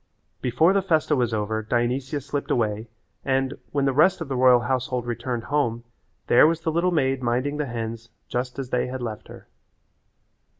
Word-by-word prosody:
Before 155 +9 +3
the 195 - +2
festa 160 -5 +1
was 120 -3 +1
over 110 0 -1
Dionysia 125 +6 -1
slipped 140 +1 -4
away, 110 -1 -1 0.3
and, 135 0 0 0.2
when 140 -1 0
the 135 - +2
rest 180 +7 +4
of 165 -4 -6
the 135 - -2
royal 125 -1 +5
household 125 -1 -1
returned 120 0 -3
home 120 -5 -1 0.4
there 125 - +6
was 165 0 0
the 160 - -1
little 170 +3 +1
maid 135 -6 +1
minding 125 +4 -1
the 150 -1 -2
hens 115 -1 -5 0.2
just 125 +1 -3
as 135 -2 -5
they 125 - +1
had 130 0 -5
left 110 -3 -6
her. - - -12
130 Hz, 180 wpm, -24 LUFS, 120-145 Hz, 0.4 s, there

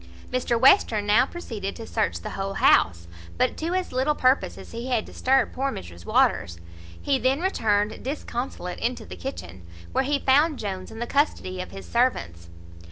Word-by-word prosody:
Mr 245 -2 +1
Western 235 - +5
now 220 +6 +4
proceeded 220 - -6
to 225 - -8
search 220 -2 -1
the - - -6
whole 195 0 -4
house, 85 - +3 0.3
but - - +1
to 335 +3 -2
as 370 -1 -2
little 265 +4 +1
purpose 260 0 +2
as - - -11
he 235 +2 -6
had 240 -4 0
disturbed 265 +1 +1
poor 270 +1 -1
Mrs 85 -1 -9
Waters. 85 0 +2 0.4
He 275 -2 +1
then 260 +4 +2
returned 215 - 0
disconsolate 245 - -4
into 245 +2 -2
the 90 - -9
kitchen, 90 +1 -7 0.3
where - - +1
he 285 +2 +1
found 290 +3 +3
Jones 190 -4 -5
in - - -10
the 240 - -2
custody 235 -10 0
of 185 - -7
his 195 - -9
servants. 85 - 0
235 Hz, 175 wpm, -25 LUFS, 190-270 Hz, 0.4 s, Western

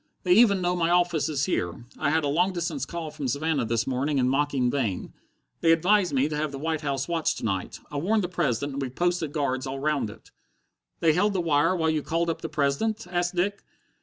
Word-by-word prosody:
They 180 - +4
even 200 -2 +5
know 175 +1 +1
my 170 -1 +1
office 175 -3 +2
is 145 -2 0
here. 90 - -2
I 150 - +1
had 160 +1 +2
a - - 0
long 175 +7 +2
distance 170 -4 -3
call 165 -3 -5
from 140 - -4
Savannah 140 0 0
this 115 0 0
morning 135 +3 -1
in 125 -1 +2
mocking 135 -2 +1
vein. 115 -10 -2 0.5
They 165 - +4
advised 180 +3 +3
me 135 0 +2
to 155 - -4
have 150 0 -1
the 140 - -6
White 160 +2 -2
House 140 -2 -2
watched 170 -2 0
to - - -5
night. 95 -4 -3
I 145 - -4
warned 205 +8 +1
the - - -1
President, 145 -6 -1
and 140 - -3
we've 130 -1 -5
posted 175 -3 0
guards 130 -3 -1
all 135 +1 -4
round 145 -5 0
it." - - -14 0.7
"They 160 -2 +4
held 200 +5 +2
the 190 - 0
wire 165 +2 +2
while 160 -2 +1
you 155 -1 0
called 165 +3 0
up - - -6
the 160 - -4
President?" 155 +11 0
asked 175 0 0
Dick. 200 +3 -1
155 Hz, 230 wpm, -26 LUFS, 140-175 Hz, 0.7 s, even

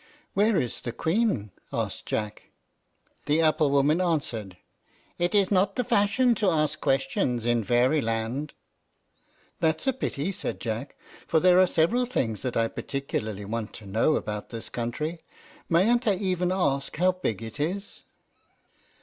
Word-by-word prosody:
"Where 210 0 +3
is 125 -5 -3
the 120 - -5
Queen?" 160 - 0 0.2
asked - - -3
Jack. 105 -1 -3 0.8
The 150 +2 +3
apple 155 -2 +3
woman 145 +5 +3
answered, 120 - -2 0.6
"It's 190 +3 +2
not 195 0 +2
the 250 - +1
fashion 220 +4 +3
to 200 - +4
ask 155 -3 0
questions 130 -3 0
in 120 -1 +2
Fairyland." 120 +2 +1 1.1
"That's 160 - +1
a 265 - +2
pity," 190 - -2
said 195 - -4
Jack, 115 +4 -4 0.3
"for 160 - +3
there 180 +1 +5
are 185 - +6
several 230 +11 +2
things 115 - -1
that 125 - -2
I 115 0 +3
particularly 110 -7 -4
want 110 +1 -4
to 110 - -11
know 110 +10 +2
about 105 -1 -4
this 115 -1 -6
country. 150 +8 -3 0.5
Mayn't 225 +8 +3
I 205 - +4
even 180 -2 0
ask 140 -8 0
how 180 +3 +4
big 115 - -3
it 110 +6 -8
is?" 190 +7 -3
150 Hz, 145 wpm, -27 LUFS, 115-185 Hz, 1.1 s, are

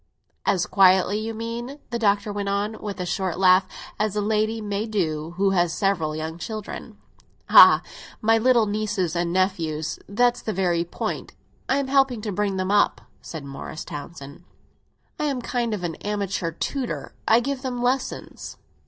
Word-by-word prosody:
"As 180 -3 +2
quietly, 190 +1 +4
you 225 +1 -4
mean," 235 +4 -5
the 235 - -1
Doctor 205 -1 +1
went 200 -1 -2
on, 205 +2 -1
with 205 -2 -5
a 180 - -2
short 185 0 -2
laugh, 185 0 +5 0.3
"as 210 -1 0
a - - +1
lady 215 +1 0
may 210 0 -3
do 165 -6 -2
who 195 0 +3
has 175 -3 +2
several 170 -6 0
young 160 +2 -5
children." 215 +2 -7 0.5
"Ah, - - +9 0.4
my 225 +1 +3
little 240 -1 +4
nephews 205 -5 -1
and 170 0 0
nieces—that's 185 +6 0
the 220 - -3
very 175 -3 +1
point! 170 - -5 0.4
I 270 - +3
am 280 -1 -1
helping 270 -4 +2
to 210 -1 -3
bring 200 0 -1
them 185 +1 -1
up," 205 0 +3 0.2
said 155 -4 -8
Morris 140 +3 -7
Townsend. 145 -1 -9 0.8
"I 300 - 0
am 280 -3 0
a - - -4
kind 240 -2 -1
of 200 -4 -2 0.2
amateur 200 -4 -2
tutor; 255 - -4
I 225 +1 +6
give 270 +2 -3
them 255 -2 -3
lessons." 255 +2 -2
205 Hz, 165 wpm, -24 LUFS, 180-225 Hz, 0.8 s, Ah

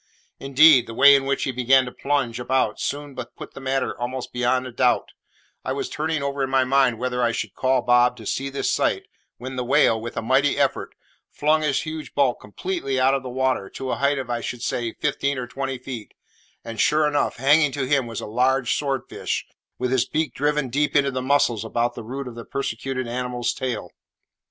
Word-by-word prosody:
Indeed, 135 0 +6
the 115 - -8
way 140 +3 +8
in 135 -1 +3
which 140 0 0
he 135 - -1
began 130 +1 +3
to 125 - -6
plunge 135 -5 -1
about 130 +2 0
soon 145 -1 -4
put 125 -1 -8
the - - -9
matter 135 0 -1
almost 125 +1 -4
beyond 125 +1 +1
a 130 - -7
doubt 125 +1 +1 0.5
I - - -2
was - - -3
turning 155 -1 -2
over 140 0 -2
in 135 - 0
my 135 -1 +3
mind 130 -2 +3
whether 125 +1 -2
I 120 -1 +2
should 110 -4 -4
call 130 -1 +1
Bob 125 0 +4
to 110 - -11
see 135 +6 -2
this 140 - -1
sight, - - +1 0.3
when 130 +2 -7
the 125 - -1
whale, 115 -3 +3
with 120 +1 -7
a 115 - -2
mighty 130 +4 +2
effort, - - 0 0.3
flung 155 +1 +1
his 145 -3 0
huge 155 -1 -7
bulk 135 -4 +2
completely 135 - -3
out 130 +1 +4
of 135 - 0
the 130 - -7
water, 130 -5 -1
to 130 -1 -4
a - - -1
height 140 +1 +1
of, 130 -2 -4
I 120 -1 -2
should 120 0 -5
say, 120 -2 -2
fifteen 140 -1 -1
or 125 - -3
twenty 135 +1 -4
feet; 125 -3 -8 0.5
and, 115 -1 -3
sure 150 0 +3
enough, 145 -1 0
hanging 145 +3 +4
to 140 -2 -2
him 135 -3 +2
was 115 -3 -5
a - - -5
large 125 +3 +1
sword 135 -3 -1
fish, - - -3 0.3
with 125 0 -2
his 125 -1 +2
beak 155 0 -1
driven 145 -2 0
deep 145 +4 0
into 140 -1 +3
the 130 0 -3
muscles 130 -5 +2
about 120 +2 -1
the - - -7
root 130 +4 -6
of 125 - -7
the 115 0 -8
persecuted 130 0 -3
animal's 125 -1 -2
tail. 120 -8 -4
130 Hz, 215 wpm, -23 LUFS, 120-140 Hz, 0.5 s, way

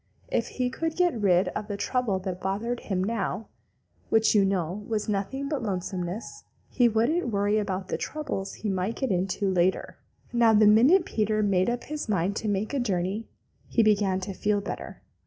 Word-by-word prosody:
If - - 0
he 250 -1 0
could 325 +4 -2
get 350 -11 +2
rid 185 -1 +3
of 210 - -5
the 205 - -4
trouble 245 -4 0
that 185 -1 -5
bothered 225 +5 -2
him 185 -2 -2
now, 215 0 -2 0.6
which, 225 0 +4
you 205 -2 +5
know, 190 0 -1
was 215 -2 -2
nothing 215 +7 -2
but 290 -3 -2
lonesomeness, 185 -1 -4 0.3
he 245 -2 +4
wouldn't 240 +9 +1
worry 205 0 +1
about 190 -2 -3
the - - -2
troubles 290 -11 -4
he 215 - -4
might 190 +4 -1
get 265 -4 -1
into 190 +2 0
later. 185 0 +1 0.4
Now 235 -2 +5
the 210 0 +6
minute 260 - +6
Peter 215 0 0
made 190 0 +2
up 240 0 -2
his 300 -5 -5
mind 195 0 +1
to 220 - -3
make 205 +4 -1
a 280 - +1
journey, 200 -1 -1 0.4
he 230 - +2
began 200 -3 +2
to 195 +1 -4
feel 205 +2 0
better. 200 - -7
210 Hz, 185 wpm, -27 LUFS, 190-235 Hz, 0.6 s, the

